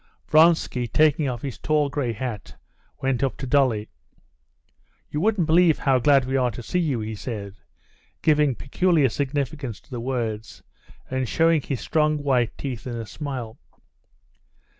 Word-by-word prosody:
Vronsky, 155 -6 +4
taking 155 +2 +3
off 120 -2 -5
his 135 -4 -5
tall 150 -2 +1
gray 140 -4 -2
hat, 115 -3 -6 0.5
went 130 -3 0
up 135 -2 -1
to 135 - -5
Dolly. 125 -6 +2 1.2
"You 150 - -2
wouldn't 210 -3 +2
believe 165 0 +4
how 135 -2 +2
glad 135 +1 +4
we 130 +1 -2
are 125 -2 +2
to 120 +1 -8
see 180 - -1
you," 145 -9 0
he 110 +1 -4
said, 105 -3 -6 0.6
giving 150 -4 +3
peculiar 155 +1 +2
significance 140 -3 -3
to - - -28
the 120 -2 -4
words, 115 -4 -4 0.5
and 130 -2 -1
showing 165 -1 +3
his 135 -2 -4
strong 155 -1 +1
white 130 -5 0
teeth 130 -4 -5
in 120 - -4
a 115 -1 -5
smile. 125 -2 -6
135 Hz, 155 wpm, -24 LUFS, 120-150 Hz, 1.2 s, Vronsky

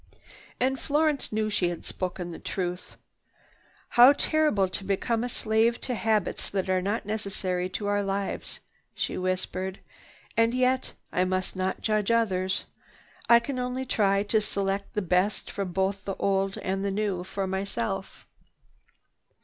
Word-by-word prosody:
And 265 +1 +1
Florence 300 -1 +1
knew 215 0 0
she 185 -4 +2
had 175 - -6
spoken 180 -1 -4
the - - -8
truth. 180 -1 -4 0.9
"How 245 +4 +8
terrible 300 -11 +2
to 185 - -4
become 225 +4 0
a 245 - -2
slave 225 +1 +2
to 250 - -1
habits 220 -3 0
that 190 -1 -1
are 185 0 +2
not 200 +4 -1
necessary 195 -4 -2
to 205 +2 -4
our 205 0 +2
lives!" 195 0 -3 0.3
she - - -1
whispered. 185 +1 -2 0.6
"And 230 +1 +3
yet, 255 0 +1 0.2
I 180 - +2
must 185 0 -1
not 185 0 -1
judge 215 -1 +1
others. 190 -5 +1 0.6
I 235 0 +9
only 255 -1 -2
can - - -23
try 200 -2 +3
to 215 +1 +2
select 200 -1 -2
the 210 - 0
best 185 +3 +1
from 195 -3 -3
both 190 +2 0
the 195 - -3
old 195 0 0
and 195 +1 -2
the 200 - 0
new 195 -2 -1
for 195 +1 -3
myself." 195 +1 -3
200 Hz, 150 wpm, -27 LUFS, 190-225 Hz, 0.9 s, I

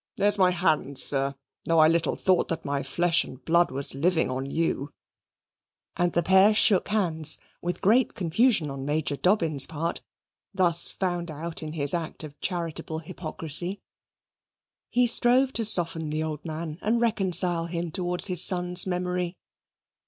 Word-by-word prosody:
There's 205 0 +1
my 185 -1 +4
hand, 160 -6 -1
sir, 135 +1 +2 0.3
though 165 - 0
I 155 -1 +6
little 165 -1 0
thought 185 -2 0
that 165 - -5
my 140 0 -2
flesh 170 +5 +1
and 130 0 -13
blood 170 +1 +2
was 135 +1 +5
living 160 +1 0
on 130 +1 -5
you 150 -2 -3 0.5
" - - -62
and 175 0 0
the 170 - 0
pair 190 +4 +4
shook 210 -2 +2
hands, 165 -7 -1 0.2
with 175 0 -5
great 225 +6 +2
confusion 185 - 0
on 135 -1 -7
Major 145 +1 -2
Dobbin's 165 -6 +2
part, 165 +2 -4 0.5
thus 175 -3 +6
found 175 -2 -4
out 160 +2 -5
in 155 -1 -7
his 145 -3 +3
act 165 -2 -5
of 145 -2 -12
charitable 170 -3 -5
hypocrisy. 165 +3 -5 1.1
He 250 0 +1
strove 250 +3 +4
to 230 - -3
soften 165 -6 0
the 155 +1 -3
old 155 -2 -6
man 160 0 -7
and 225 +3 0
reconcile 185 -6 +1
him 170 -1 -5
towards 180 +1 +1
his 180 -3 +5
son's 180 0 +2
memory. 180 0 -3
170 Hz, 160 wpm, -25 LUFS, 155-185 Hz, 1.1 s, I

